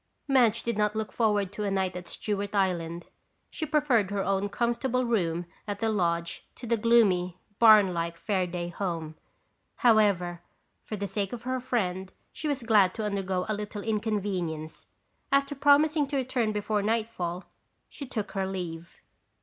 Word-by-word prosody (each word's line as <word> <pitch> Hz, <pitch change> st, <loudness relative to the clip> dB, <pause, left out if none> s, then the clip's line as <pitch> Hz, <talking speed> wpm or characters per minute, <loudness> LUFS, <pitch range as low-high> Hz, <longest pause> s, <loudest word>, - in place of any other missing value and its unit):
Madge 240 Hz, -5 st, +3 dB
did 235 Hz, -3 st, -2 dB
not 210 Hz, 0 st, +1 dB
look 215 Hz, -1 st, -3 dB
forward 205 Hz, -4 st, +1 dB
to 210 Hz, -, -4 dB
a 205 Hz, -, 0 dB
night 190 Hz, -1 st, 0 dB
at 180 Hz, -1 st, -7 dB
Stewart 205 Hz, +1 st, -3 dB
Island. 175 Hz, -3 st, 0 dB, 0.5 s
She 315 Hz, -, -4 dB
preferred 270 Hz, -10 st, +2 dB
her 200 Hz, -1 st, -1 dB
own 195 Hz, +1 st, 0 dB
comfortable 240 Hz, +3 st, 0 dB
room 175 Hz, -7 st, 0 dB, 0.2 s
at 205 Hz, -1 st, -3 dB
the 225 Hz, -, +1 dB
lodge 170 Hz, -4 st, -1 dB
to -, -, -9 dB
the 235 Hz, 0 st, +2 dB
gloomy, 205 Hz, -6 st, +3 dB, 0.2 s
barn 215 Hz, -5 st, +7 dB
like 170 Hz, 0 st, -3 dB
Fairaday 180 Hz, -2 st, -2 dB
home. 165 Hz, -5 st, -3 dB, 0.6 s
However, 200 Hz, -7 st, +3 dB, 0.4 s
for 215 Hz, -, -5 dB
the 200 Hz, -1 st, -3 dB
sake 200 Hz, 0 st, -3 dB
of 240 Hz, -1 st, -6 dB
her 255 Hz, +1 st, -1 dB
friend, 190 Hz, -7 st, -2 dB, 0.2 s
she 310 Hz, -, -4 dB
was 280 Hz, -4 st, -1 dB
glad 205 Hz, -5 st, +4 dB
to 220 Hz, -, -3 dB
undergo 190 Hz, -3 st, -1 dB
a 215 Hz, -, 0 dB
little 210 Hz, 0 st, -5 dB
inconvenience. 200 Hz, -8 st, -2 dB, 0.4 s
After 275 Hz, +1 st, +2 dB
promising 290 Hz, +2 st, +4 dB
to 280 Hz, 0 st, -2 dB
return 250 Hz, -4 st, 0 dB
before 210 Hz, 0 st, -1 dB
nightfall, 205 Hz, -5 st, -2 dB, 0.4 s
she 280 Hz, -, -8 dB
took 215 Hz, -5 st, -4 dB
her 195 Hz, -2 st, -1 dB
leave. 170 Hz, -3 st, -6 dB
205 Hz, 160 wpm, -28 LUFS, 185-230 Hz, 0.6 s, barn